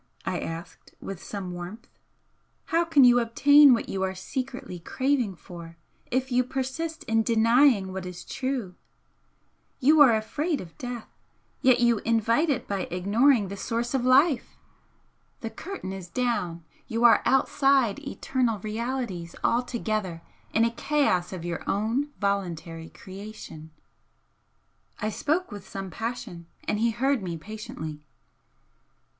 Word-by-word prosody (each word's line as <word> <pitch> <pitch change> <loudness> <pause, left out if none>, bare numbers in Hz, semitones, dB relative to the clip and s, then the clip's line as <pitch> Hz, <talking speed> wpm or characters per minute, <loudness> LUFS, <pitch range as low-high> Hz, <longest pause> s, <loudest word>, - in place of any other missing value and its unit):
I - - -1
asked, 165 +1 -8
with 195 -3 -7
some 195 -3 -6
warmth 180 +8 -8 0.8
"How 335 +1 +2
can 315 -4 +5
you 245 -1 +7
obtain 285 +5 +6
what 235 - +2
you 190 - -3
are 190 0 -1
secretly 255 -3 -5
craving 255 +1 0
for, 170 -1 -11 0.3
if 260 +1 -1
you 250 +1 +3
persist 270 +6 -4
in 225 0 +2
denying 230 -2 +4
what 190 -1 -5
is 180 -1 -8
true? 260 -8 -3 1.1
You 300 +4 +5
are 250 -6 +8
afraid 285 +8 -1
of 165 -3 -10
death 245 -3 -5 0.5
yet 255 -2 +5
you 235 -2 +4
invite 230 +8 +2
it 275 - -1
by 195 -2 -2
ignoring 210 +6 +3
the 200 - -5
source 235 +4 -2
of 265 -2 +1
life! 265 +3 +3 0.8
The 225 - -4
curtain 330 - -6
is 185 -2 -8
down, 180 -8 -1 0.2
you 230 +1 -1
are 235 -1 +7
outside 270 -4 +3
eternal 245 -4 -1
realities 215 -4 -4
altogether 215 -8 -1 0.3
in 225 - +3
a 230 - +1
chaos 235 -9 +1
of 180 -3 -6
your 170 -1 -3
own 225 +8 0
voluntary 170 -5 -2
creation!" 190 -5 -10 1.3
I 215 -1 -1
spoke 315 - -1
with 205 -2 -9
some 195 -1 -6
passion, 225 -7 -5 0.2
and 210 - -1
he 230 +1 +3
heard 260 +2 +1
me 175 -3 -4
patiently. 160 -6 -7
225 Hz, 135 wpm, -26 LUFS, 190-260 Hz, 1.3 s, are